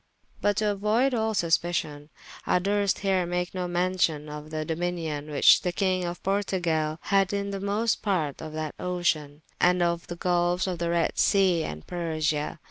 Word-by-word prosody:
But 205 -1 +1
to 210 -1 +1
auoyde 220 +7 +1
all 220 -2 0
suspition, 165 -4 0 0.4
I - - +4
durst 200 +2 +1
here 185 -2 +2
make 180 +1 -2
no 180 -1 -2
mention 175 -4 0
of 150 +1 -8
the 155 0 -3
dominion 160 -3 -3
which 145 -2 +6
the 180 - -1
Kyng 185 -1 0
of 175 0 -5
Portugale 175 -6 0
had 195 -1 +2
in 200 0 -2
the 195 - -4
most 210 +4 0
parte 170 -9 -1
of 160 -1 -6
that 155 -1 -4
ocean, 160 -5 -1 0.2
and 180 0 +4
of 170 0 -1
the 175 - -6
gulfes 175 0 +1
of 180 -3 -3
the 170 0 -1
Redde 170 -1 0
Sea 185 -5 +3
and 75 +1 -7
Persia. 155 -3 -2
175 Hz, 175 wpm, -26 LUFS, 160-195 Hz, 0.4 s, which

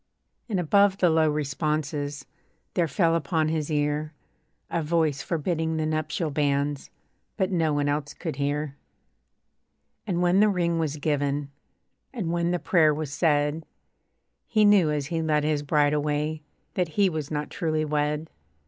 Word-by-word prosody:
And 200 -4 0
above 195 +3 +3
the 180 -4 +3
low 160 -1 +3
responses 150 0 -2 0.5
There 175 -2 +1
fell 165 +3 +2
upon 155 0 0
his 155 -1 -2
ear 150 +1 -1 0.6
A 170 - 0
voice 155 -2 +1
forbidding 160 0 -1
the 155 - 0
nuptial 155 +1 -1
banns; 140 0 0 0.5
But 190 -2 0
no 165 -4 +1
one 145 -1 0
else 145 0 -2
could 160 -5 -5
hear. 145 0 -1 1.3
And 175 -4 0
when 180 +2 +4
the 210 +1 +5
ring 170 -3 0
was 155 -2 -1
given, 145 -1 -1 0.6
And 200 -10 -3
when 170 0 0
the 175 - +1
prayer 160 -4 +3
was 150 -2 -4
said, 150 0 +1 0.8
He 215 -2 +3
knew, 200 -6 +5
as 150 -2 -1
he 165 +2 -2
led 150 -2 +1
his 150 -1 +1
bride 145 0 +2
away, 150 +1 -1 0.3
That 180 -2 0
he 200 -1 +5
was 155 -5 -3
not 150 -1 -3
truly 155 -2 -1
wed. 150 +1 -1
155 Hz, 155 wpm, -26 LUFS, 145-170 Hz, 1.3 s, the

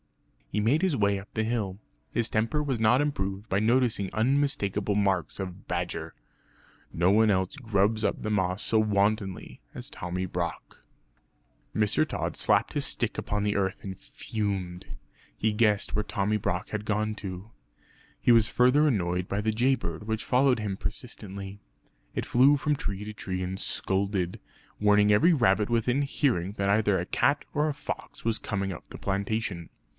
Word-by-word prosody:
He 105 - 0
made 120 +10 +2
his 185 -6 +2
way 100 -1 +2
up 95 - -13
the 110 - 0
hill; 110 -5 -2 0.3
his 115 -1 0
temper 115 +7 0
was 135 -5 -1
not 110 +3 +4
improved 100 -8 -2
by 95 - +1
noticing 115 -3 +2
unmistakable 110 -5 +1
marks 100 -4 0
of 95 -1 -6
badger. 85 -2 -3 0.8
No 85 +2 +2
one 110 +1 +5
else 95 +7 0
grubs 110 -4 +1
up - - 0
the 110 - -2
moss 95 -2 0
so 110 - +2
wantonly 100 - 0
as - - -6
Tommy 90 +1 -3
Brock. 85 -1 -4 0.9
Mr. 105 -1 +2
Tod - - -3
slapped - - +2
his - - 0
stick - - -1
upon 105 0 -2
the 105 0 0
earth 95 -1 -1
and 95 -2 -6
fumed; 95 -5 -4 0.5
he 110 0 +1
guessed 105 -2 +2
where 105 - +1
Tommy 105 0 -1
Brock 90 -3 -2
had 105 -1 -3
gone 110 0 0
to. 95 +1 -7 0.7
He - - +3
was 115 -2 +4
further 125 +5 +4
annoyed 90 -7 0
by 100 - -1
the 110 +1 +1
jay 125 +5 +3
bird 85 -5 -5
which 110 0 -2
followed 130 -1 +3
him 105 -3 -2
persistently. 100 -3 -7 0.5
It - - -2
flew 135 +4 +5
from 150 +2 0
tree 105 -5 -4
to 105 - -6
tree 95 -3 -4
and 95 +1 -3
scolded, 95 -2 -1 0.4
warning 105 0 +5
every 165 +12 +5
rabbit 110 - +3
within 120 +3 +1
hearing 125 - 0
that 100 -1 -1
either 105 -2 +3
a 90 - -2
cat 140 +9 +1
or 150 +1 +1
a - - -1
fox 145 - -7
was 115 -1 +1
coming 95 -2 -2
up 80 - -11
the - - -10
plantation. 100 -3 -2
105 Hz, 170 wpm, -28 LUFS, 95-115 Hz, 0.9 s, one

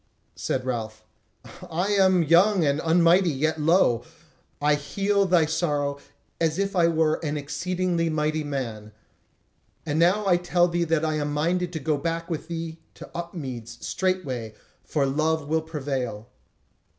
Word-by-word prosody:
Said - - -2
Ralph: 110 -3 -4 0.7
"I 175 +5 -1
am 190 -3 +4
young 175 +3 +4
and 140 +1 +1
unmighty, 170 +3 +4
yet 155 +2 -1
lo! 150 - +3 0.6
I 150 +1 +3
heal 195 +7 0
thy 175 -3 +4
sorrow 145 -3 -1 0.4
as 160 -1 +1
if 195 0 -1
I 170 -2 +4
were 160 -1 +1
an 150 -1 -2
exceeding 170 +3 -1
mighty 155 0 0
man. 115 -7 -5 0.9
And 155 0 -1
now 185 +5 +3
I 180 -3 +4
tell 175 0 +2
thee 170 0 0
that 165 -1 +1
I 155 -1 0
am 145 0 -2
minded 175 +4 0
to 160 - -3
go 150 0 0
back 165 +3 -3
with 160 -1 -4
thee 165 -1 -5 0.2
to - - -11
Upmeads 130 -9 -6
straightway; 135 - -2 0.3
for 145 -3 0
love 155 +2 0
will 160 +1 +1
prevail." 135 -8 -4
160 Hz, 150 wpm, -25 LUFS, 145-175 Hz, 0.9 s, am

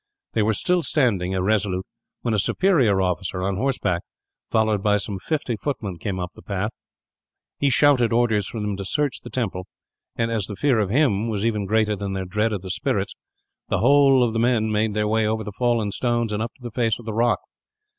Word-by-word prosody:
They 110 - +2
were 105 +1 +2
still 180 - +1
standing, 105 - +1
irresolute, 95 -1 0 0.4
when 115 - 0
a 105 - +2
superior 120 - +3
officer 90 0 -2
on 95 0 0
horseback, 110 -8 0 0.5
followed 110 -2 +2
by 105 0 +3
some 100 -1 -4
fifty 140 - -2
footmen, 105 - -4
came 95 -1 -3
up 90 0 -4
the - - -14
path. 100 +2 -3 0.9
He 140 - +3
shouted 135 -3 +4
orders 115 -4 +2
for 115 - -6
them 105 -1 -2
to 100 - -4
search 145 +7 -1
the - - -10
temple 95 -7 -3 0.5
and, 115 0 0
as 110 -5 -1
the 105 - -6
fear 130 0 +2
of 100 -3 0
him 115 -4 +2
was 105 -1 -1
even 105 -3 0
greater 110 0 +2
than 100 0 -4
their 95 -1 -3
dread 105 +4 0
of 100 -3 -3
the 95 - -4
spirits, - - -1 0.5
the - - 0
whole 135 0 +5
of 115 -2 0
the 115 - 0
men 115 -2 +2
made 105 0 0
their 105 0 +1
way 110 0 +2
over 110 0 -1
the 105 - -6
fallen 115 -1 0
stones, 120 0 0
and 105 - -1
up 115 +1 -3
to 130 - -21
the 120 - -6
face 115 -1 +1
of 120 - -13
the 110 - -4
rock. 115 +2 +2
110 Hz, 215 wpm, -23 LUFS, 100-120 Hz, 0.9 s, whole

